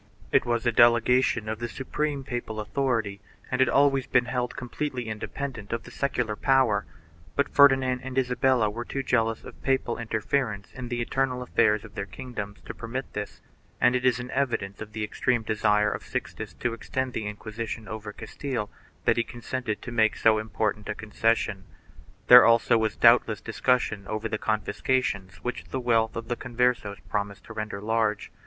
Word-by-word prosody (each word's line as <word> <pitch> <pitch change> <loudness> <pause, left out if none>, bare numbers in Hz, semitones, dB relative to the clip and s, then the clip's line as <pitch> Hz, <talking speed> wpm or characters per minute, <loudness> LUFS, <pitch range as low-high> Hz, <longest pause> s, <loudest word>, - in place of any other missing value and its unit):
It - - +3
was 120 -1 0
a 120 - +4
delegation 120 -1 +4
of 110 0 -3
the 120 0 -3
supreme 140 +2 -3
papal 120 -4 -4
authority 110 -3 -1 0.3
and 125 0 +1
had 130 - +4
always 135 -2 +3
been 125 - +3
held 125 -1 -2
completely 125 -1 -4
independent 110 +1 -5
of 115 0 -2
the - - -12
secular 125 -6 -1
power, 130 -5 +2 0.5
but 140 - 0
Ferdinand 135 -3 +5
and 130 0 -6
Isabella 125 -2 +2
were 120 +3 -5
too 135 +2 -4
jealous 115 -3 +1
of - - -12
papal 130 -3 0
interference 110 -1 -1
in 130 -1 -6
the 120 0 -2
internal 125 +1 -1
affairs 110 -4 +2
of 105 - -13
their 100 -2 -4
kingdoms 105 0 -7
to - - -6
permit 120 +5 -6
this, 105 -1 -6 0.4
and 125 - +4
it 125 - 0
is 125 -2 +3
an 125 +1 -6
evidence 115 -8 -1
of 110 0 -8
the 110 - -4
i - - 0
extreme 120 +2 0
desire 105 -1 +2
of - - -4
Sixtus - - -5
to 120 -1 -2
extend 130 +2 -3
the 110 - -3
Inquisition 110 +1 -6
over 110 -1 -6
Castile 120 -2 -5 0.3
that - - +3
he 115 - +3
consented 120 -1 -4
to 125 - -6
make 110 -2 +3
so 110 -1 +4
important 110 -1 -2
a - - -2
concession. 110 -2 0 0.6
There 125 0 +10
also 115 0 +5
was 110 -1 +1
doubtless - - +5
discussion 110 -6 0
over 110 +1 -2
the 110 -1 -3
confiscations 105 -2 -1
which 125 - -4
the 130 - -4
wealth 115 -2 +2
of 115 0 -5
the 120 - -1
Converses 120 -4 0
promised 100 -1 -3
to - - -10
render 105 -2 -4
large. 110 0 0
115 Hz, 180 wpm, -27 LUFS, 110-125 Hz, 0.6 s, There